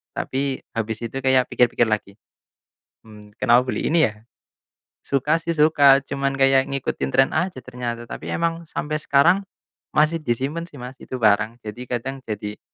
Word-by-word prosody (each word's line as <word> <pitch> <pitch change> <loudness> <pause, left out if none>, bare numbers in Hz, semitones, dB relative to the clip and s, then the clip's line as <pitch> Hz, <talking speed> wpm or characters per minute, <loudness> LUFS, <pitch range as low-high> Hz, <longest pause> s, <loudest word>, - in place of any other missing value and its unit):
tapi 135 0 -2
habis 115 0 -4
itu 135 +4 -4
kayak 130 -1 +2
pikir-pikir 120 -1 +3
lagi, 105 -3 -2 0.9
"Hmm, 105 -1 -15
kenapa 125 +1 +3
beli 125 - -1
ini 165 -6 +4
ya?" 105 +1 -11 0.8
Suka 150 +4 0
sih 165 0 -3
suka, 145 -3 +5
cuman 140 0 -2
kayak 135 0 +3
ngikutin 135 -1 -2
trend 135 +1 +4
aja 155 -6 -2
ternyata. 120 -2 -5
Tapi - - -8
emang 170 -1 -2
sampai 155 -1 -3
sekarang 175 +8 +3 0.5
masih 155 +2 +3
disimpen 145 +6 -2
sih, 150 - -17
Mas, 125 +1 -9
itu 130 - -7
barang, 110 0 +2
jadi 110 +3 -7
kadang 135 +3 -4
jadi, 105 0 -5
135 Hz, 155 wpm, -22 LUFS, 115-150 Hz, 0.9 s, suka